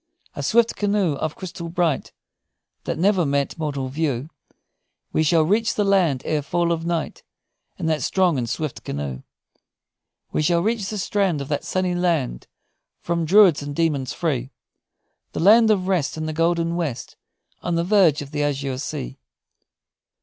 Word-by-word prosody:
A - - -4
swift 230 0 +2
canoe 200 -5 +1
of 155 +1 -3
crystal 170 -2 -7
bright, 170 -4 0 0.7
That - - -2
never 190 +1 +3
met 140 +1 -1
mortal 140 -4 -2
view 145 0 -2 0.8
We - - +2
shall 160 +1 +4
reach 215 +7 +1
the 210 - +1
land 180 -10 +2
ere 155 -1 0
fall 170 +4 0
of 165 0 -2
night, 170 -3 -2 0.6
In - - -4
that 155 -1 0
strong 185 -4 +2
and 120 -2 -3
swift 155 +1 -4
canoe; 70 -2 -4 1.1
We - - 0
shall 170 +2 +2
reach 220 -2 -1
the 215 - -4
strand 195 -4 0
Of 140 - -6
that 145 - -1
sunny 185 -1 -1
land, 170 - -1 0.5
From 170 -1 -1
druids 185 -3 +6
and 145 0 -6
demons 145 -6 0
free; 135 -7 -2 0.8
The - - -3
land 220 +5 +6
of 190 -4 +2
rest 175 -6 0
In 155 - -3
the 155 - -3
golden 165 +1 +1
west, 160 -9 -4 0.5
On 175 - -1
the 170 - +1
verge 175 -6 +3
of 140 - -12
the 150 -1 -2
azure 140 -2 -1
sea! 65 - -5
165 Hz, 165 wpm, -22 LUFS, 145-185 Hz, 1.1 s, druids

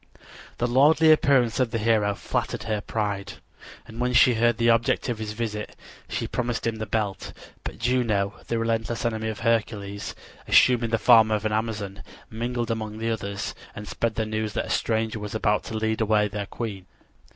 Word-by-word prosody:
The 120 - 0
lordly 150 +6 +5
appearance 135 -6 +3
of 130 -2 +2
the 115 - -2
hero 105 -2 +2
flattered - - -3
her 110 -2 -2
pride, 105 -2 -3 0.5
and 115 0 -11
when 125 0 0
she 125 +1 +6
heard 120 0 +2
the 115 +1 +4
object 115 +2 +1
of 120 -3 -2
his 105 -1 -4
visit, 105 -2 -4 0.3
she - - -2
promised 120 -2 -2
him 115 -1 -1
the 110 0 -4
belt. 105 -3 -2 0.3
But - - -6
Juno, 115 -5 +1
the 115 - -1
relentless 115 0 -1
enemy 110 -1 -1
of 110 -1 -6
Hercules, 110 -4 -1 0.3
assuming 120 -2 +5
the 115 - +2
form 110 -1 +6
of 110 0 -1
an 110 - +1
Amazon, 105 -3 -3 0.3
mingled 120 +1 -2
among 110 -1 -4
the 115 +1 -1
others 100 -2 -4 0.2
and 105 0 -7
spread 115 -2 -2
the 110 - -1
news 110 -1 -3
that - - -1
a - - -9
stranger 110 -1 0
was 105 0 -6
about 105 -1 +1
to 110 - -4
lead 110 0 -1
away 105 -1 +3
their 100 0 -5
queen. 100 -6 -6
110 Hz, 185 wpm, -25 LUFS, 105-115 Hz, 0.5 s, she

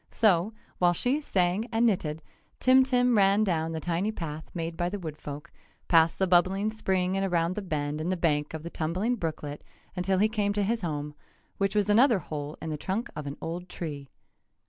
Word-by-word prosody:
So, 200 -2 +3 0.3
while 175 -1 +4
she 255 - 0
sang 190 -3 0
and 225 +1 +2
knitted, 160 -8 0 0.4
Tim 260 +1 +6
Tim 250 -2 +2
ran 200 +1 +4
down 165 -5 0
the 160 - -3
tiny 175 +6 -1
path 160 -5 -6
made 165 -1 -4
by 175 +1 -1
the 205 - -4
woodfolk, 150 -4 -7 0.4
past 165 -1 +4
the 190 - +2
bubbling 190 +4 +3
spring 190 -4 0
and 195 - 0
around 175 -2 +1
the 210 - -4
bend 150 -4 -2
in 165 - -2
the 185 - 0
bank 150 -2 0
of 155 - -6
the 170 - -6
tumbling 185 +10 -1
brooklet 150 -6 -5 0.3
until 185 +1 +1
he 210 +3 +4
came 210 -2 0
to 205 0 0
his 225 +3 0
home, 150 -4 -3 0.5
which 195 +1 0
was 210 -1 +2
another 230 +3 +5
hole 150 -3 -6
in 160 - -3
the 150 - -3
trunk 195 +9 -3
of 150 -2 -5
an 140 - -5
old 175 +2 -5
tree. 145 -6 -6
180 Hz, 200 wpm, -28 LUFS, 160-205 Hz, 0.5 s, Tim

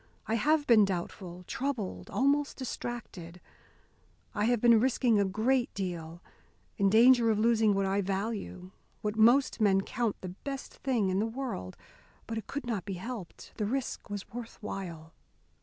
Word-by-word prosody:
I 220 - -2
have 295 +7 +2
been 225 -5 +6
doubtful, 180 -1 -4
troubled, 215 - -4
almost 280 +2 +1
distracted. 230 -9 -6 0.9
I 210 0 0
have 240 0 +2
been 235 0 +6
risking 245 -2 +2
a 200 - +3
great 235 +6 +1
deal, 175 -3 -5 0.5
in 200 -2 +3
danger 235 +2 +6
of 215 - +2
losing 220 -2 +3
what 195 0 +1
I 195 +1 +1
value, 195 -1 -4 0.3
what 210 0 -1
most 240 +3 +4
men 195 -2 +4
count 225 +1 -2
the 185 - -5
best 275 +9 -7
thing 235 -8 0
in 185 +1 +1
the 220 - +1
world. 225 - -5 0.5
But 225 0 -3
it 215 - -11
could 285 -1 -5
not 220 -6 -2
be 200 - -5
helped. 195 -1 -8
The 210 - -1
risk 265 -1 -3
was 205 -1 -5
worth 235 0 -7
while. 170 -7 -7
215 Hz, 160 wpm, -30 LUFS, 190-240 Hz, 0.9 s, been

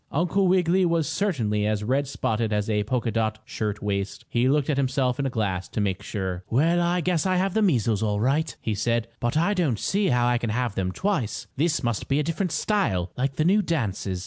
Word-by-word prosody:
Uncle 180 +5 +1
Wiggily 185 0 +3
was 165 -4 +1
certainly 110 - 0
as 105 -1 -1
red 135 +5 0
spotted 110 -4 -1
as 105 -1 0
a 105 -1 +1
polka 120 0 -1
dot 110 -1 0
shirt 105 -1 -4
waist. 100 -1 -3
He 120 +2 +1
looked 145 0 +2
at 150 - 0
himself 130 -1 0
in 140 - 0
a - - -1
glass 95 -6 -2
to - - -4
make 95 -2 -1
sure. 95 -3 -4
"Well, 165 +8 +3
I 175 +1 +1
guess 180 0 +1
I 185 - +2
have 190 +1 +1
the 220 - +2
measles 115 - +2
all 105 -2 0
right," 145 +7 +1
he 110 - -1
said. 115 +2 0
"But 120 +5 0
I 170 +6 +2
don't 160 - +1
see 200 - 0
how 125 -4 +2
I 120 0 +2
can 120 - -2
have 120 0 -1
them 95 -2 -1
twice. 155 - -2
This 160 +3 +1
must 120 -3 -1
be 140 +1 +1
a - - +1
different 165 +4 -2
style, 160 - 0
like 135 +1 -1
the 155 - +1
new 200 +4 +4
dances." 100 - -2
125 Hz, 225 wpm, -25 LUFS, 105-170 Hz, -, new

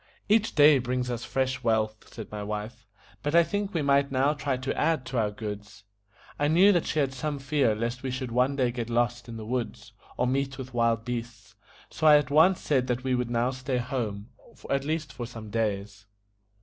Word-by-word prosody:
"Each 215 +1 +2
day 145 -1 +7
brings 125 0 -2
us 120 -1 -4
fresh 130 -1 -1
wealth," 110 -1 -1
said 110 - -9
my 105 -1 -5
wife; 105 +2 -6 0.3
"but 145 +2 -1
I 170 - +7
think 200 +4 -2
we 160 - +1
might 140 0 +3
now 135 +2 +2
try 145 -3 -2
to 130 +1 -3
add 160 -6 +1
to 125 -1 -2
our 105 -2 +1
goods." 105 -1 -8 0.6
I 145 - +2
knew 180 +7 +6
that 175 -4 +1
she - - -2
had 140 -3 +1
some 145 +3 -3
fear 135 -4 +1
lest 120 +3 -3
we 135 - -3
should 130 -1 -4
one 125 +3 +2
day 125 -3 +1
get 120 -1 -4
lost 120 0 0
in 115 - -7
the 110 - -7
woods, 120 0 -4 0.2
or 125 - +1
meet 135 +1 -1
with 130 -1 -8
wild 115 -1 +1
beasts, 120 -2 -6 0.4
so 155 - +1
I 150 -1 +9
at 145 -1 -1
once 165 +5 +5
said 130 -4 +1
that 125 0 -1
we 130 -1 0
would 125 -1 0
now 120 +1 +1
stay 130 0 -3
at 120 +1 -4
home, 110 -4 -3 0.4
at 140 0 0
least 155 0 -2
for 120 -2 -6
some 115 -3 -9
days. 105 -2 -2
125 Hz, 215 wpm, -27 LUFS, 115-140 Hz, 0.6 s, I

